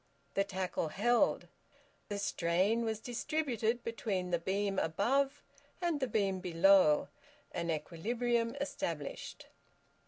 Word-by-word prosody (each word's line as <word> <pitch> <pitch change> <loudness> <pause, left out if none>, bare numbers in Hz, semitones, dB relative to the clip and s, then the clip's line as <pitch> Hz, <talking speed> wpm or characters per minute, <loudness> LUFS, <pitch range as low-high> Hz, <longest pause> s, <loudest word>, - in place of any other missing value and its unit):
The 195 - +2
tackle 185 -4 -2
held. 235 +9 +2 0.6
The 205 - -2
strain 195 +4 +1
was 220 -2 -1
distributed 240 -2 -1
between 200 -6 -2
the 175 - +2
beam 195 +2 0
above 270 - +1 0.4
and 345 -4 0
the 260 - 0
beam 195 -4 0
below, 180 -2 +4 0.4
and 170 0 -3
equilibrium 230 - -1
established. 170 - -4
200 Hz, 105 wpm, -33 LUFS, 180-240 Hz, 0.6 s, below